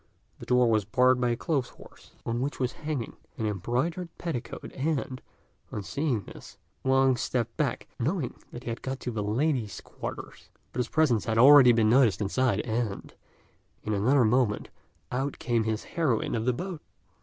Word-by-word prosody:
The - - -10
door 125 0 +4
was 110 -2 +3
barred 125 +5 +3
by 125 - +2
a 120 - +1
clothes 140 -3 -1
horse, - - -17
on 120 +1 -1
which 140 +3 -3
was 125 -1 0
hanging 150 -7 -5 0.2
an 110 - -2
embroidered 125 - -1
petticoat; 150 -8 -5
and, 135 -3 -2 0.5
on 105 - -4
seeing 135 -4 -1
this, - - -12 0.3
Wang 135 0 +4
stepped 115 -1 -2
back, 150 -3 -1
knowing 145 +1 -1 0.2
that 120 - -8
he - - -5
had 115 - -6
got 130 0 -4
to 125 - -3
the 110 -2 -3
ladies' 115 +1 0
quarters; - - -8 0.2
but - - -4
his 125 - 0
presence 140 -9 +2
had 110 -1 0
already 135 0 +9
been 110 -2 +3
noticed 120 -7 +4
inside, 105 +1 +1
and, 110 -3 -3 0.7
in 110 - -2
another 120 +6 +3
moment, 110 -2 +1 0.4
out 135 +3 -2
came 115 -2 0
his 110 -1 -1
heroine 150 -10 0
of 115 -1 -1
the 125 - +2
boat. 175 +3 -5
125 Hz, 175 wpm, -28 LUFS, 110-135 Hz, 0.7 s, already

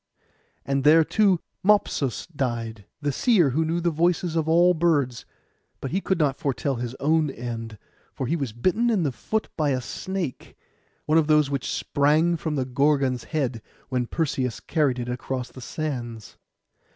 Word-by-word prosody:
And 135 0 0
there 160 +3 +7
too 185 +3 +3 0.2
Mopsus 190 - +2
died, 115 - -4 0.2
the 145 - +1
seer 175 - +3
who 160 +6 +1
knew 165 +2 0
the 170 0 +1
voices 170 +1 +1
of 160 -1 0
all 175 +2 +5
birds; 150 -8 +1 0.5
but 135 - -5
he 190 +4 0
could 190 - 0
not 145 -4 +1
foretell 135 0 -1
his 120 +1 -4
own 155 +2 +2
end, 115 -3 -6 0.3
for 130 - -4
he 150 +7 0
was 140 -8 -2
bitten 185 - +1
in 210 -7 +2
the 145 - 0
foot 220 - -2
by 155 -3 +1
a 130 -2 +1
snake, 175 +3 -5 0.5
one 155 +2 +4
of 155 - +1
those 150 -2 +4
which 140 -2 -2
sprang 155 +4 +2
from 160 -1 -3
the 130 -3 0
Gorgon's 135 -1 +1
head 130 -7 -2 0.3
when 125 -2 -1
Perseus 140 -7 -1
carried 145 -6 0
it 120 -1 -4
across 125 +1 -4
the 130 - -11
sands. 120 -6 -5
145 Hz, 170 wpm, -25 LUFS, 125-165 Hz, 0.5 s, there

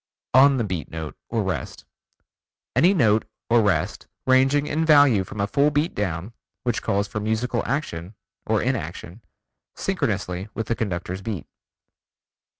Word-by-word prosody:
On 135 +2 +7
the 120 - +1
Beat 90 -8 -4
Note 80 -3 -6
(or - - 0
rest): - - -4 0.9
Any 180 - +5
note 110 - +3 0.3
(or 120 -1 +6
rest) 95 -7 0 0.2
ranging 135 +3 +4
in 155 +2 0
value 145 -10 +6
from 100 - -9
a 100 - +2
full 140 +8 +3
beat 150 +3 0
down, 95 +1 -3 0.3
which 120 -2 0
calls 100 +1 0
for 110 - -4
musical 110 +3 -1
action 105 - -3 0.3
(or - - +2
inaction) 90 +7 -4 0.5
synchronously 90 +3 -2
with 115 - -2
the 115 - -1
conductor's 95 -3 -3
beat. 100 -3 -4
110 Hz, 145 wpm, -24 LUFS, 95-135 Hz, 0.9 s, On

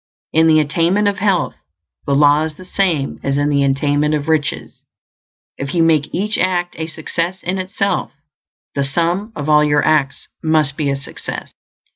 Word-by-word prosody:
In 160 +1 +4
the 155 -1 +5
attainment 170 +7 +1
of 200 -1 -1
health, 195 -4 +1 0.5
the 140 - +2
law 145 +1 +5
is 155 -1 -3
the 185 - -13
same 175 -7 -1
as 140 0 -1
in 145 0 +1
the 140 -1 +2
attainment 145 +2 +1
of 150 0 -3
riches; 160 -2 -1 0.8
if 140 +4 -4
you 165 - +4
make 155 -3 +2
each 210 +4 -1
act 175 -1 0
a 160 - -3
success 165 +3 -3
in 185 +2 -2
itself, 190 0 -1 0.6
the 140 - 0
sum 170 +9 -1
of 145 -1 -4
all 150 0 +5
your 150 -1 +2
acts 140 -4 +1
must 155 -3 +1
be 145 -2 -1
a 140 - +1
success. 135 0 -7
155 Hz, 175 wpm, -18 LUFS, 145-175 Hz, 0.8 s, the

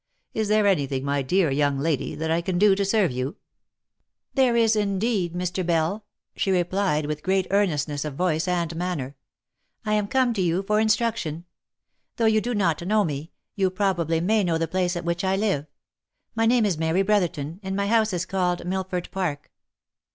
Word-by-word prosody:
Is 220 -1 -1
there 215 0 +3
any 180 -9 +2
thing, 135 0 -3
my 140 0 0
dear 165 +3 +1
young 140 0 +1
lady, 145 0 -1
that 160 0 -2
I 165 +1 +2
can 175 +1 -2
do 205 +1 +5
to 200 +1 0
serve 195 - +2
you 130 +3 -3 0.3
?" - - -63
" - - -58
There 260 -4 +3
is 225 -1 +4
indeed, 200 -3 0
Mr. 180 +1 -2
Bell 170 +5 0
!" - - -59
she - - -1
replied, 180 -3 +1
with 150 0 -4
great 190 +1 +1
earnestness 150 -8 +1
of 150 -3 -5
voice 160 0 0
and 170 -2 -1
manner. 165 -6 -3 0.4
" - - -44
I 215 - 0
am 210 -1 +1
come 255 0 +2
to 200 - -1
you 175 +2 +1
for 210 +2 +1
instruction. 215 -7 0 0.7
Though 230 - 0
you 220 -1 +4
do 245 +1 -2
not 175 -7 +1
know 210 +4 +2
me, 150 -1 -4 0.2
you 190 -2 +1
probably 180 -4 0
may 210 +4 +2
know 170 -3 +1
the 165 0 -1
place 180 +1 0
at 175 0 -4
which 170 +1 -1
I 190 0 +1
live. 195 -8 0 0.7
My 225 0 +1
name 235 -1 +4
is 180 -6 0
Mary 165 +4 +1
Brotherton, 175 -6 0
and 190 -1 -4
my 200 0 0
house 220 +1 +2
is 180 0 -2
called 180 -2 -1
Millford 185 -1 -3
Park." 170 -7 -3
185 Hz, 205 wpm, -24 LUFS, 160-205 Hz, 0.7 s, do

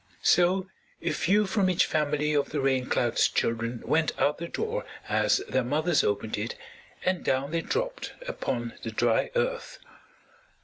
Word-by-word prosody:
So 180 +2 +4 0.4
a - - +1
few 205 +4 +2
from 190 -1 +1
each 180 - +3
family 150 -1 0
of 145 -1 +1
the 145 - -2
Rain 130 -2 +1
Cloud's 120 -1 +2
children 115 +1 -1
went 160 0 +1
out 150 +1 +2
the 170 - -4
door 450 - -3 0.2
as 395 - +2
their 130 - +1
mothers 155 +6 +2
opened 105 +1 -1
it 110 +3 -3 0.5
and 185 -2 +1
down 135 +2 0
they 165 0 0
dropped - - -3
upon 120 - -3
the 115 - -4
dry 115 +1 +1
Earth. 485 0 -1
150 Hz, 160 wpm, -27 LUFS, 125-190 Hz, 0.5 s, So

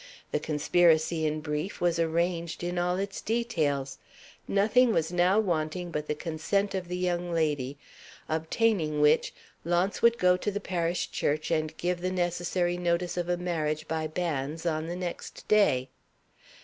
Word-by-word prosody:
The - - +1
conspiracy, 160 +1 +2
in 155 0 -2
brief, 150 +5 -3
was 175 -1 +1
arranged 170 +1 -1
in 175 0 -1
all 180 +1 +1
its 195 +1 -4
details. 155 - -1 0.5
Nothing 225 +5 +4
was 160 -2 0
now 180 +3 +3
wanting 175 -2 -1
but 150 -1 -3
the 150 - -1
consent 175 +6 -1
of 185 -2 -3
the 180 +1 -3
young 175 -1 -1
lady; 145 -5 0 0.5
obtaining 160 0 0
which, 150 0 +4 0.3
Launce 175 +4 0
would 235 0 +5
go 180 0 +4
to 195 - -2
the 205 0 -2
parish 175 -3 -2
church 150 +3 -1
and 155 -1 -1
give 175 0 -1
the 185 - 0
necessary 175 0 0
notice 175 0 0
of 175 0 -2
a 175 - +1
marriage 155 -3 -2
by 160 -1 -1
banns 155 -1 -3
on 160 -1 -1
the 175 - -4
next 180 -1 -6
day. 165 -12 +3
175 Hz, 160 wpm, -28 LUFS, 155-180 Hz, 0.5 s, would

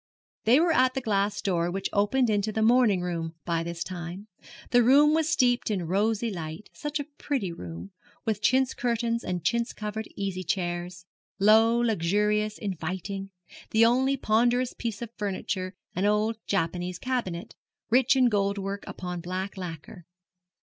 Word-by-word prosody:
They 240 +6 +6
were 335 +1 +3
at 255 -3 +3
the 265 - -1
glass 205 -2 0
door 175 -3 +1
which 195 +2 -2
opened 220 +5 +2
into 210 0 +1
the 220 +1 0
morning 225 -5 +4
room 165 -2 -3
by 165 -1 0
this 170 0 -4
time. 180 +2 -7 0.5
The 245 - +6
room 285 +5 +6
was 320 0 +2
steeped 245 -5 +2
in 190 -5 -1
rosy 215 +5 0
light 165 +2 -7
such 295 0 -4
a - - -1
pretty 275 - -3
room, 90 - -8 0.3
with 215 -2 -1
chintz 260 +4 +3
curtains 235 -1 -1
and 180 -2 -3
chintz 235 +5 0
covered 210 0 -5
easy 195 -2 -3
chairs, 175 0 -3 0.3
low, 220 +3 +5
luxurious, 210 0 +1
inviting; 195 +1 -4 0.4
the 225 +1 +5
only 260 +4 +3
ponderous 245 +2 +2
piece 230 -1 -4
of 230 - -7
furniture 190 -2 -3 0.2
an 185 +3 0
old 215 +2 +1
Japanese 180 -1 -1
cabinet, 190 -8 -3 0.4
rich 260 +2 +5
in 255 -2 +5
gold 200 -2 +1
work 200 0 -4
upon 180 -1 -5
black 185 +3 -4
lacquer. 175 -1 -8
205 Hz, 155 wpm, -27 LUFS, 180-235 Hz, 0.5 s, They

